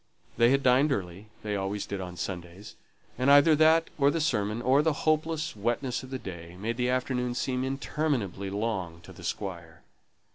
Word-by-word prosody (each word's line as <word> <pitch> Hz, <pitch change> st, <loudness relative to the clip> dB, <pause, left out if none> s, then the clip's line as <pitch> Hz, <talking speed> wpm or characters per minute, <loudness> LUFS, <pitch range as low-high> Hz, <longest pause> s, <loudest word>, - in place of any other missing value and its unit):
They 120 Hz, 0 st, +5 dB
had 135 Hz, +1 st, +2 dB
dined 130 Hz, +4 st, +4 dB
early; 95 Hz, -3 st, -4 dB, 0.2 s
they 105 Hz, -1 st, -2 dB
always 100 Hz, +1 st, -2 dB
did 100 Hz, -1 st, -5 dB
on 90 Hz, -1 st, -7 dB
Sundays; 90 Hz, +2 st, -6 dB, 0.4 s
and 130 Hz, +2 st, +2 dB
either 145 Hz, +3 st, +7 dB
that, 160 Hz, +1 st, +4 dB
or 140 Hz, 0 st, +5 dB
the 165 Hz, -, 0 dB
sermon, 110 Hz, -8 st, 0 dB
or 130 Hz, +4 st, +3 dB
the 155 Hz, -1 st, -1 dB
hopeless 155 Hz, -1 st, 0 dB
wetness 120 Hz, +4 st, -1 dB
of 130 Hz, -, -11 dB
the 130 Hz, -, -3 dB
day, 85 Hz, -5 st, -9 dB
made 115 Hz, +3 st, -3 dB
the 125 Hz, 0 st, 0 dB
afternoon 125 Hz, -1 st, -1 dB
seem 125 Hz, 0 st, -1 dB
interminably 130 Hz, -, -2 dB
long 95 Hz, -5 st, -3 dB
to -, -, -13 dB
the -, -, -13 dB
Squire. 85 Hz, -6 st, -5 dB
120 Hz, 180 wpm, -28 LUFS, 95-140 Hz, 0.4 s, either